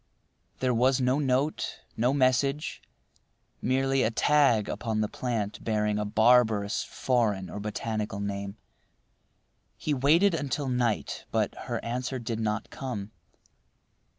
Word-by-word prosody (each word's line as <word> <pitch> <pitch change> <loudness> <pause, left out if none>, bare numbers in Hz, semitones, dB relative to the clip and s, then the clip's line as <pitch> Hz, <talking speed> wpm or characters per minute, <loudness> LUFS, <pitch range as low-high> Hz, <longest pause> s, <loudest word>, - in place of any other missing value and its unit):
There 130 -1 +2
was 125 +3 +3
no 130 +2 +2
note, 140 +2 0
no 120 +3 +2
message, 140 +2 +1 0.8
merely 135 +1 +1
a 110 - +3
tag 125 -3 +3
upon 110 -3 -2
the 105 - +1
plant 110 -3 -3
bearing 105 -1 0
a 105 - -1
barbarous 110 -1 +3
foreign 105 -8 0
or - - -5
botanical 105 -1 -3
name. 100 0 -4 1.2
He 150 - -1
waited 160 +9 +4
until 145 -3 -2
night, 120 -3 -1
but - - 0
her - - -4
answer 125 +2 -2
did 115 -2 -4
not 110 -1 -2
come. 110 -6 -5
120 Hz, 125 wpm, -28 LUFS, 105-130 Hz, 1.2 s, waited